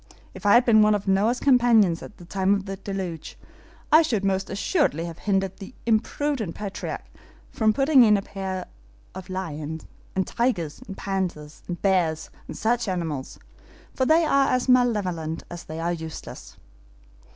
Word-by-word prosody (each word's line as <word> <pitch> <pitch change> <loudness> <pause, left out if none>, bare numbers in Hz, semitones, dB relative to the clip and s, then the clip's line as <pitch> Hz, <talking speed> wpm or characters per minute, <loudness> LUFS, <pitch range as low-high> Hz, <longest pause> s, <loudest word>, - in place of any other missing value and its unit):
If 190 +2 -4
I 205 - +7
had 240 +1 +5
been 220 -2 +6
one 210 0 +5
of 205 0 -4
Noah's 205 +6 +2
companions 235 -10 +4
at - - -11
the 175 - -13
time 190 +2 +1
of 195 -1 -4
the 195 -1 -4
deluge, 190 -4 -6 0.5
I 310 +2 +8
should 225 -11 0
most 190 0 0
assuredly 195 - 0
have 170 -1 -8
hindered 195 -2 -1
the 200 +5 -10
imprudent 230 - 0
patriarch 200 -2 -5 0.5
from 220 -1 +2
putting 270 +4 +4
in 210 -2 +5
pairs 190 -2 -5 0.5
of 190 - -9
lions, 160 -4 -5 0.3
and 190 0 +1
tigers, 230 - -1
and 195 - -8
panthers, 180 -6 -4
and 175 -1 -4
bears, 175 -5 +1 0.2
and - - -7
such 235 +1 0
animals, 165 -8 -3 0.6
for 260 - 0
they 320 +1 +5
are 275 -2 +3
as 255 0 0
malevolent 200 -11 +1
as 175 0 -8
they 155 +1 -7
are 170 +1 -1
useless." 160 -1 -8
195 Hz, 160 wpm, -25 LUFS, 175-235 Hz, 0.6 s, I